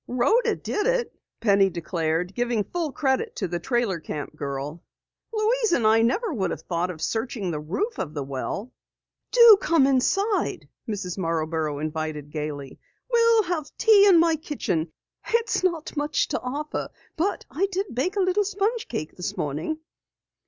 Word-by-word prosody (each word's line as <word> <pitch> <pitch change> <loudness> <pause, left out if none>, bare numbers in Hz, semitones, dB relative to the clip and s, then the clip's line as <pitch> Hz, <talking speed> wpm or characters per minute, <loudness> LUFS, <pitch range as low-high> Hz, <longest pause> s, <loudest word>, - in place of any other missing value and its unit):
"Rhoda 255 - +2
did 420 +1 -2
it," - - 0 0.3
Penny 200 -3 +4
declared, 170 0 -2
giving 240 -2 0
full 330 - -3
credit 280 - 0
to 190 - -2
the 175 0 -3
trailer 235 -3 0
camp 150 -1 -6
girl. 145 +2 -5 0.5
"Louise 445 -1 +1
and 235 - +2
I 220 +1 +5
never 390 - +1
would 190 -8 -1
have 160 - -5
thought 175 +1 -1
of 165 -3 -6
searching 225 -5 -2
the 150 - -3
roof 200 - -3
of 155 -2 -4
the 145 - -2
well." 140 - -4 0.6
"Do 470 -4 +9
come 325 -5 +4
inside," 390 - +1 0.2
Mrs. 195 -3 -4
Marborough 160 -3 -1
invited 155 -1 -4
gaily. 150 -3 -5 0.3
"We'll 465 -2 +5
have 340 -5 -3
tea 420 -3 +6
in 360 -4 +7
my 330 -1 +3
kitchen. 190 - -2 0.4
It's 465 -4 +1
not 335 -5 -1
much 295 0 0
to - - -2
offer, 290 +4 -4 0.3
but 375 +6 -1
I 350 +9 +1
did 385 -2 -2
bake 285 - -1
a 400 - +2
little 370 +2 +2
sponge 415 +4 -1
cake 155 - -5
this 180 - -4
morning." 155 - -2
245 Hz, 160 wpm, -25 LUFS, -, 0.6 s, Do